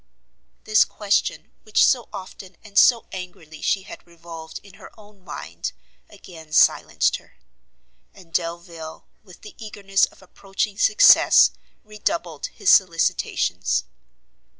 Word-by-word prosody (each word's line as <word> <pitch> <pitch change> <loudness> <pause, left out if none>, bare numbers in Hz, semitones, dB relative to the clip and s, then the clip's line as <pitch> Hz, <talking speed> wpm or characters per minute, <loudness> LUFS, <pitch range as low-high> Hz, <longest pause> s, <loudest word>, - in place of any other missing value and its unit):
This 215 0 +4
question, 205 -1 -2
which 215 - +3
so 245 -3 +1
often 190 -2 -11
and 205 -2 -16
so 235 -2 +4
angrily 175 -4 -10
she 195 - 0
had 190 - -13
revolved 165 -1 -11
in 200 -2 -17
her - - -12
own 205 -2 -19
mind, 85 - -7 0.4
again 160 -3 -14
silenced - - +3
her; - - -23 0.7
and 175 -4 -19
Delvile, 170 -2 -5 0.2
with 185 -4 -17
the 210 - -12
eagerness 195 -2 0
of - - -19
approaching 195 +2 -5
success, 420 - +6 0.3
redoubled 175 -7 -4
his - - 0
solicitations. 170 -4 +1
190 Hz, 120 wpm, -22 LUFS, 170-210 Hz, 0.7 s, success